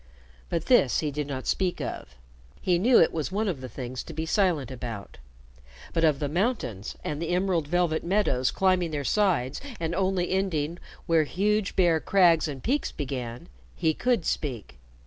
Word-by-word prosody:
But 165 -1 -2
this 240 - +4
he 150 -2 -1
did 145 0 -3
not 130 -2 -5
speak 185 -2 0
of. 65 - -6 0.4
He 180 -2 +1
knew 235 +6 +5
it 165 - +5
was 160 +2 -2
one 210 +3 0
of 165 -9 -2
the 130 - -6
things 125 0 -5
to 165 - -8
be 160 +1 -3
silent 160 - +1
about. 115 - -7 0.7
But 165 - +1
of 155 -3 +4
the 145 - -2
mountains 155 - -2
and 150 +1 -3
the 170 - -2
emerald 180 -3 +1
velvet 175 -1 +1
meadows 170 -9 +1
climbing 185 -3 +2
their 145 -2 -3
sides 155 -8 +1 0.2
and 165 0 -2
only 185 -1 0
ending 175 -4 -1 0.3
where 165 -2 +3
huge 205 +5 0
bare 170 -4 +4
crags 170 -3 +4
and 140 -3 -6
peaks 275 +4 0
began, 125 -4 -5 0.3
he 160 - +1
could 240 -1 0
speak. 120 - -3
165 Hz, 175 wpm, -27 LUFS, 140-185 Hz, 0.7 s, knew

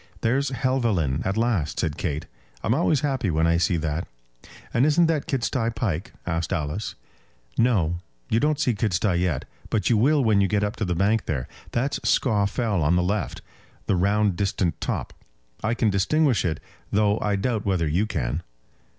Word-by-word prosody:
"There's 135 +4 +1
Helvellyn 115 - 0
at 95 +2 -1
last," 110 -10 0
said 80 -4 -1
Kate. 75 -2 -3 0.4
"I'm 115 - +2
always 155 0 +2
happy 135 -9 0
when 80 0 +2
I 85 0 +3
see 90 0 +2
that." 80 +1 -2 0.7
"And 120 - +3
isn't 155 +4 +4
that 160 -3 0
Kidsty 125 -3 0
Pike?" 100 -4 -2
asked 85 -2 -2
Alice. 85 +3 -2 0.6
"No; 90 -9 +2 0.3
you 110 - +2
don't 150 +1 +1
see 125 -5 +2
Kidsty 100 -3 +1
yet. 90 -7 0 0.2
But 110 +2 +1
you 115 - +4
will 140 +5 +4
when 110 -4 +4
you 100 - +3
get 105 +1 +1
up 105 0 -1
to 110 - -1
the 90 -1 -1
bank 100 +5 +1
there. 65 -5 -2 0.2
That's 135 +4 -1
Scaw 105 -6 +2
Fell 105 -3 -1
on 75 +3 +3
the 90 - +2
left; 100 +4 -2 0.4
the 100 - +1
round 100 +1 +2
distant 90 -4 -1
top. - - -3 0.5
I 115 +2 +1
can 110 -3 +2
distinguish 125 - +2
it, 80 -3 -1 0.3
though 105 0 +2
I 105 -1 0
doubt 105 +1 -1
whether 90 -5 +1
you 90 +8 +1
can." 65 - -2
105 Hz, 180 wpm, -25 LUFS, 85-120 Hz, 0.7 s, isn't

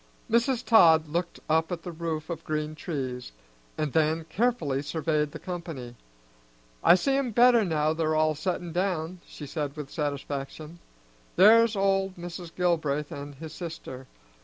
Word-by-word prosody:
Mrs. 240 +1 +2
Todd 160 -8 +6
looked 170 +2 -3
up 160 +2 +1
at 170 -2 -4
the 175 - -5
roof 160 -1 -4
of 165 -1 -5
green 155 0 -2
trees, 130 -6 -5 0.5
and 155 -3 -2
then 160 0 +2
carefully 190 - 0
surveyed 150 0 -1
the - - -7
company. 165 -9 -6 0.9
"I - - +8
see 270 +8 +1
'em 275 -3 0
better 235 0 +5
now 155 -4 +1
they're 160 -1 0
all 155 0 +3
settin' 175 +2 -3
down," 180 -1 -2
she 150 - -9
said 145 0 -4
with 150 -2 -7
satisfaction. 145 +2 -4 0.6
"There's 225 +4 +6
old 195 -1 +1
Mr. 175 0 -7
Gilbraith 155 -5 0
and 145 0 -7
his 155 +2 -9
sister. 145 -7 -8
160 Hz, 150 wpm, -27 LUFS, 150-180 Hz, 0.9 s, I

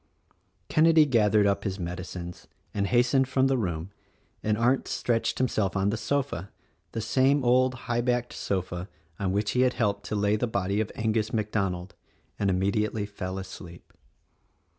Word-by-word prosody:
Kenedy 160 0 +5
gathered 105 -4 +4
up 100 0 +1
his 95 -1 -2
medicines 90 0 -6 0.3
and 100 -1 0
hastened 125 +3 +3
from 130 0 +2
the 135 0 +3
room 90 -6 -2 0.5
and 105 0 0
Arndt 120 +4 +2
stretched 115 -1 0
himself 110 -6 0
on 95 +1 +2
the - - -1
sofa 125 -6 -2 0.2
— - - -43
the 115 - -2
same 135 +5 +2
old 130 +1 +4
high 120 0 0
backed 120 0 0
sofa 90 -1 -3 0.3
on 95 -2 0
which 105 +1 0
he 125 - +2
had 130 -1 +3
helped 100 -3 0
to 105 - -2
lay 105 0 +2
the 115 +3 0
body 100 -1 0
of 110 - -3
Angus 110 -1 0
MacDonald 95 -4 -2 0.2
— - - -39
and 100 - +1
immediately 100 +3 0
fell 95 -2 -5
asleep. 90 -2 -10
105 Hz, 165 wpm, -27 LUFS, 95-120 Hz, 0.5 s, Kenedy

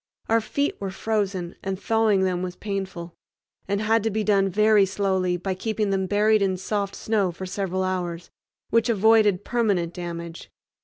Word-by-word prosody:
Our 225 0 +3
feet 280 +6 -1
were 195 - -2
frozen, 195 -3 -2
and 190 -1 -3
thawing 220 -3 +2
them 180 -1 0
was 180 -1 -4
painful, 190 -4 -5 0.5
and 200 +1 0
had 220 +1 +2
to 225 - 0
be 215 +1 -1
done 195 -2 +3
very 210 +1 +4
slowly 190 -2 0
by 190 +2 -3
keeping 215 +1 -2
them 190 -1 0
buried 210 +2 +3
in 190 -1 +1
soft 200 +1 -2
snow 205 -5 0
for 180 +3 -7
several 190 0 -2
hours, 175 -2 -3 0.4
which 230 +1 +3
avoided 215 -3 +4
permanent 200 -8 0
damage. 170 -1 -7
195 Hz, 165 wpm, -24 LUFS, 185-215 Hz, 0.5 s, very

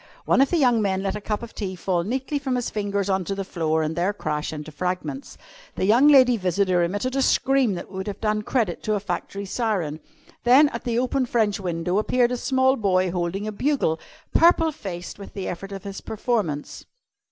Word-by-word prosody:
One - - +4
of 275 - +4
the 350 - +1
young 245 -6 +3
men 190 -2 0
let 195 - -1
a 210 - -5
cup 210 +1 -3
of 235 - -9
tea 190 -3 -4
fall 175 -1 -1
neatly 265 - -2
from 265 -2 -2
his 245 -1 -2
fingers 200 -2 -1
on 190 -1 +1
to 195 - -2
the 195 - -3
floor 160 -4 -1
and 155 +1 -2
there 180 +4 0
crash 150 -6 -3
into 155 0 -7
fragments. 180 - -4 0.4
The - - 0
young 235 +8 +5
lady 260 -4 +6
visitor 185 -1 +1
emitted 205 +10 -1
a 270 - +2
scream 265 -5 +2
that 175 - -8
would 190 0 -5
have 205 - -5
done 215 -1 0
credit 210 -5 -1
to 215 - 0
a - - 0
factory 200 +1 -4
siren. 190 -8 -2 0.4
Then 270 +5 +6
at 235 - -7
the 235 -1 0
open 255 +1 0
French 220 -4 +1
window 180 +1 -1
appeared 245 +2 +2
a 250 - -1
small 260 +1 +2
boy 185 -4 +1
holding 180 +3 -2
a 215 - -3
bugle, 215 - 0 0.3
purple 330 -1 +5
faced 185 - -7
with 200 - -11
the 195 - -4
effort 195 +3 -6
of 195 0 -7
his 200 -1 -7
performance. 210 - -3
205 Hz, 210 wpm, -24 LUFS, 185-245 Hz, 0.4 s, lady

